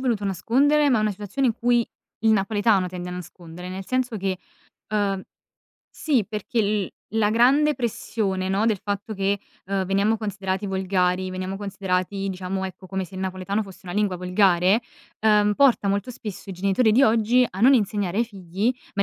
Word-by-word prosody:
voluto 235 -6 0
nascondere, 275 - +2
ma 250 -4 +3
è - - +1
una 215 0 +1
situazione 210 +7 -1
in 225 - 0
cui 240 0 +2 0.3
il 225 - +3
napoletano 205 -2 +2
tende 180 0 -6
a - - -5
nascondere. 175 0 -9
Nel 190 +1 -6
senso 255 -3 -1
che 190 -2 -2 0.5
uhm, 200 -2 0 0.7
sì, 270 -10 0
perché 215 +2 -2
l 205 -2 0 0.3
la 215 -2 +3
grande 275 +7 +4
pressione, 205 -5 -2
no, 195 +3 +1
del 215 -5 +1
fatto 205 +1 -3
che, 195 +1 0 0.3
ehm, 195 0 -1
veniamo 200 +4 +2
considerati 200 -2 -3
volgari, 185 -1 0
veniamo 185 +1 -4
considerati 195 -1 -2
diciamo, 190 0 -3
ecco, 185 0 -8
come 190 0 -2
se 190 - -14
il 185 - -5
napoletano 190 +3 -2
fosse 190 -2 -13
una 175 - -6
lingua 205 -1 0
volgare, 180 +2 +3 0.4
uhm, 210 -1 +4
porta 260 -4 +4
molto 200 +4 0
spesso 210 -4 -8
i - - -4
genitori 195 +5 +2
di 250 +6 +5
oggi 230 +2 +3
a 190 - -8
non 255 +5 +7
insegnare 205 -4 0
ai 235 - +3
figli, 195 +1 -2 0.2
ma, 200 - +1
200 Hz, 180 wpm, -24 LUFS, 190-220 Hz, 0.7 s, non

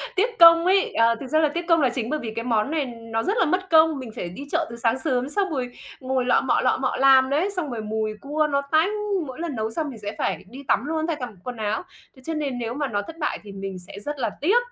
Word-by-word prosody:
Tiếc 445 +4 0
công 335 0 +9
ấy, 385 +1 +3
ờ, 230 0 +4
thực 270 - -7
ra 310 +4 +2
là 305 -2 +3
tiếc 345 0 -3
công 330 -2 +4
là 260 - +4
chính 240 -1 -3
bởi 305 - -1
vì 220 -2 -5
cái 230 +1 -3
món 230 +3 +1
này 305 -4 0
nó 230 -2 -4
rất 415 +4 0
là 375 - +4
mất 370 +4 -1
công, 320 -3 +5
mình 240 -4 -7
phải 175 - -4
đi 275 +11 -8
chợ - - +1
từ 235 - -7
sáng 235 +2 +1
sớm 260 -2 -1
xong 390 +2 0
rồi 255 -5 -3 0.3
ngồi 260 -1 -1
lọ 250 - +4
mọ, - - +1
lọ - - +2
mọ - - 0
làm 265 0 +6
đấy, 320 +8 +1
xong 320 -6 -2
rồi 225 -2 -4
mùi 215 0 -2
cua 300 +2 0
nó 280 -1 +1
tanh! 320 +6 +4 0.4
Mỗi 260 - -8
lần 330 -5 -3
nấu 220 0 -2
xong 310 +3 -2
mình 235 -5 -9
sẽ 205 0 -6
phải - - -2
đi 270 +4 -10
tắm - - +2
luôn, 315 +1 -1
thay 330 - 0
cả 255 -4 -4
bộ 225 - -11
quần 245 -2 -6
áo, 215 +6 -2 0.3
thế 260 - -17
cho 325 - -2
nên 285 -5 -2
nếu 230 0 -3
mà 290 0 -2
nó 205 -4 -1
thất 325 +10 -10
bại 300 - -2
thì 205 - -10
mình 195 -1 -6
sẽ 185 +3 -11
rất 290 +5 -5
là 230 -3 0
tiếc. 390 +10 +4
270 Hz, 295 wpm, -24 LUFS, 230-315 Hz, 0.4 s, công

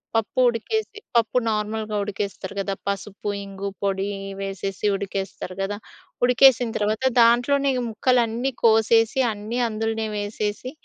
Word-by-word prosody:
పప్పు 225 +3 0
ఉడికేసి, 420 - -2 0.2
పప్పు 230 +1 +3
నార్మల్‌గా 215 0 -2
ఉడికేస్తరు 200 -1 -5
గదా! 195 0 -1
పసుపు, 200 +1 -3 0.2
ఇంగు 195 0 -6 0.2
పొడి 195 -1 0 0.4
వేసేసి 195 0 -3
ఉడికేస్తరు 195 -2 -5
గదా! 200 +1 -2 0.5
ఉడికేసిన 250 -1 +5
తర్వాత 215 +4 0 0.2
దాంట్లోనే 245 +4 +4 0.2
ముక్కలన్నీ 240 +2 +1
కోసేసి, 225 +1 +4
అన్నీ 215 +3 -5
అందులోనే 225 0 -2
వేసేసి, 205 +3 -3
215 Hz, 110 wpm, -23 LUFS, 200-235 Hz, 0.5 s, ఉడికేసిన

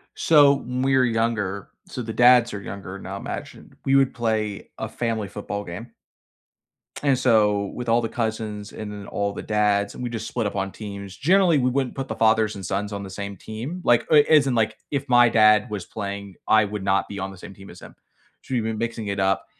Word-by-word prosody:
So 145 -3 +6
when 125 -1 -4
we 135 0 +3
were 130 - +4
younger 110 -4 -1 0.2
so 125 - -6
the 110 -1 -5
dads 120 0 +5
are 100 - -5
younger 100 -1 -7
now, 95 0 -7
imagine, 100 - -8
we 135 - +2
would 135 -1 +4
play 110 -3 -2
a - - -4
family 115 -3 -2
football 100 0 -5
game 100 +7 -8 1.1
and 140 -3 +3
so 105 -5 +3
with 125 -1 -4
all 115 +1 +4
the 115 - -1
cousins 110 -3 -4
and 105 -1 -7
then 100 -1 -8
all 100 0 -2
the - - -6
dads, 105 -1 +1
and - - -7
we 120 - -2
just 110 -1 -5
split 115 -4 -2
up - - -6
on 95 -1 -2
teams. 100 -3 -8
Generally, 175 +1 +4
we 125 -1 +2
wouldn't 130 0 -1
put 135 -1 -4
the - - -4
fathers 110 -1 +2
and 95 -2 -7
sons 100 +3 -2
on 100 - -4
the 95 - -8
same 100 +1 -6
team. 120 - -7
Like, 120 -1 +3
uh, - - +5
as 150 -3 +5
in, 125 - 0
like, 110 -1 +1
if 140 -1 -2
my 120 -1 +6
dad 110 0 +4
was 100 -4 -5
playing, 100 -2 -6
I 110 0 +5
would 105 -1 -5
not 95 0 +1
be 100 -1 -6
on 95 +1 -4
the 95 - -12
same 95 - -11
team 95 0 -14
as - - -13
him, - - -13 0.5
so - - -7
we've 120 -3 +1
been 110 0 -2
mixing 115 -1 -3
it 100 0 -2
up, 95 0 +1
110 Hz, 230 wpm, -23 LUFS, 100-120 Hz, 1.1 s, So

